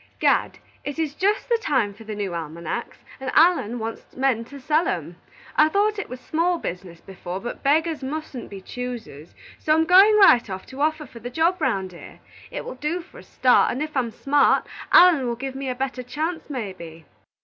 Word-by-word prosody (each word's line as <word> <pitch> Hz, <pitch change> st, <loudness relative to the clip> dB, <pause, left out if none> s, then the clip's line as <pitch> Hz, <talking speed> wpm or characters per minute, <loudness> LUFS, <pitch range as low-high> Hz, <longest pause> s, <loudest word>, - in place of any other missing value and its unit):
"Gad, -, -, +2 dB, 0.3 s
it 285 Hz, +1 st, -5 dB
is 315 Hz, -3 st, -1 dB
just 400 Hz, +6 st, 0 dB
the 470 Hz, -1 st, +2 dB
time 255 Hz, -, +1 dB
for 215 Hz, +3 st, -14 dB
the 215 Hz, 0 st, -5 dB
new 200 Hz, -3 st, -3 dB
almanacs, 170 Hz, +6 st, -5 dB, 0.2 s
and 265 Hz, -1 st, -4 dB
Allen 320 Hz, -, +4 dB
wants 225 Hz, 0 st, -7 dB
men 260 Hz, -3 st, +1 dB
to 280 Hz, +3 st, -11 dB
sell 305 Hz, +5 st, +1 dB
'em. -, -, -3 dB, 0.4 s
I 305 Hz, 0 st, +5 dB
thought 410 Hz, +3 st, +1 dB
it -, -, -5 dB
was 255 Hz, -, -7 dB
small 335 Hz, +6 st, 0 dB
business 180 Hz, -, -7 dB
before, 185 Hz, -1 st, -7 dB
but 240 Hz, +4 st, -6 dB
beggars 315 Hz, +2 st, +1 dB
mustn't 270 Hz, -2 st, -6 dB
be 195 Hz, -1 st, -9 dB
choosers, 230 Hz, -, -7 dB, 0.2 s
so 310 Hz, -, +2 dB
I'm 320 Hz, 0 st, +3 dB
going 390 Hz, +5 st, +7 dB
right 250 Hz, -, +6 dB
off 190 Hz, 0 st, -6 dB
to 265 Hz, +2 st, -8 dB
offer 310 Hz, 0 st, 0 dB
for 235 Hz, -3 st, -13 dB
the 240 Hz, +2 st, -6 dB
job 330 Hz, +7 st, +1 dB
'round 190 Hz, -9 st, 0 dB
here. 170 Hz, -, -13 dB, 0.3 s
It -, -, -6 dB
will -, -, -5 dB
do 300 Hz, +7 st, -3 dB
for -, -, -15 dB
a -, -, -13 dB
start, 250 Hz, -1 st, +3 dB
and 260 Hz, +5 st, -2 dB
if 305 Hz, -1 st, -7 dB
I'm 250 Hz, -3 st, +1 dB
smart, 280 Hz, +6 st, +2 dB, 0.3 s
Allen 335 Hz, -8 st, +7 dB
will 235 Hz, -, -1 dB
give 265 Hz, +2 st, -5 dB
me 270 Hz, 0 st, -4 dB
a 250 Hz, -, -2 dB
better 255 Hz, 0 st, -3 dB
chance 310 Hz, +7 st, -4 dB
maybe." 185 Hz, -, -7 dB
265 Hz, 205 wpm, -23 LUFS, 220-315 Hz, 0.4 s, going